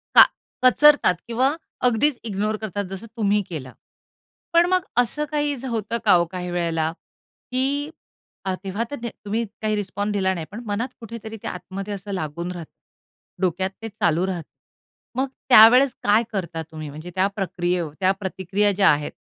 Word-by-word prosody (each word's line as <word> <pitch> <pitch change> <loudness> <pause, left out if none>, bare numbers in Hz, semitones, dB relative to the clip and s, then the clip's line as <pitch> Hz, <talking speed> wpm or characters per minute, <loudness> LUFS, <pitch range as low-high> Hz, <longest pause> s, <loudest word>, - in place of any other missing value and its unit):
का - - +11 0.4
कचरतात 290 -6 +6
किंवा 255 +5 +1 0.3
अगदीच 245 +3 +1
इग्नोर 210 0 -1
करतात 205 -2 -3
जसं 195 +4 -6
तुम्ही 210 -1 +2
केलं. 140 -7 -6 0.8
पण 340 +1 +6
मग 370 -1 +2
असं 245 +5 +2
काही 295 -1 0 0.2
होतं 230 0 -1
का 205 - +7
हो 175 -1 +5
काही 180 -1 -4
वेळेला 165 -2 0 0.6
की 255 +1 +1 1.0
तेव्हा 195 +4 -2
तर 245 -5 -5
तुम्ही 220 +1 -3 0.2
काही 215 -1 +1
रिस्पॉन्स 205 +1 -2
दिला 190 -2 +1
नाही 165 -3 -5
पण 215 +4 -7
मनात 210 +4 -1
कुठेतरी 225 -1 -8
ते - - -4
आतमध्ये 195 +3 -5
असं 200 +1 -7
लागून 170 0 -3
राहतं. 170 -3 -8 0.7
डोक्यात 185 +1 +1
ते 225 - -5
चालू 185 -5 +1
राहतं. 175 -5 -4 0.7
मग 265 +2 +1 0.2
त्यावेळेस 245 +3 +8
काय 210 +3 +4
करता 170 -4 -3
तुम्ही? 155 -1 -7
म्हणजे 155 +5 -9
त्या 190 +1 +3
प्रक्रियेव 175 -4 -1
त्या 185 0 +4
प्रतिक्रिया 195 +1 0
ज्या 195 0 +4
आहेत 150 0 -1
200 Hz, 155 wpm, -23 LUFS, 180-230 Hz, 1.0 s, का